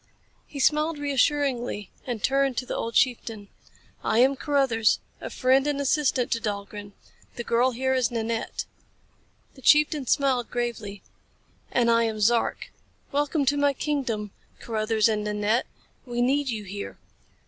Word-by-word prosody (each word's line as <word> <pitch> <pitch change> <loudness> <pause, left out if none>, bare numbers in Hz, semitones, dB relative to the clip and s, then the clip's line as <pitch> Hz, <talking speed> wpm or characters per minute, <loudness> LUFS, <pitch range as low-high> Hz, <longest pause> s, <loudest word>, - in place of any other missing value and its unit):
He 285 - -8
smiled 305 +3 +2
reassuringly 275 -6 0 0.2
and 235 -5 -4
turned 275 -2 +2
to 255 - -1
the - - -4
old 230 0 -3
chieftain. 225 -5 0 0.5
"I 220 - +1
am 265 +3 +5
Carruthers, 270 -6 +2 0.2
a - - -5
friend 265 +2 +2
and 290 -1 0
assistant 275 -3 +1
to 230 - +1
Dahlgren. 205 -1 -5 0.4
The 240 - -4
girl 240 +2 +2
here 260 +2 -1
is 255 -2 +2
Nanette." 230 -1 -3 0.9
The 265 - -16
chieftain 300 0 +4
smiled 265 -4 +1
gravely. 230 -5 -4 0.7
"And 235 -1 +3
I 230 0 +4
am 220 -1 -3
Zark. 230 +2 +1 0.4
Welcome 290 +1 0
to 285 +2 +2
my 285 0 +3
kingdom, 250 -8 -2 0.3
Carruthers 220 -1 +1
and 215 -2 0
Nanette. 210 +3 0 0.4
We 240 0 0
need 275 +2 +1
you 220 -3 -3
here. 200 +1 -7
245 Hz, 145 wpm, -26 LUFS, 225-275 Hz, 0.9 s, am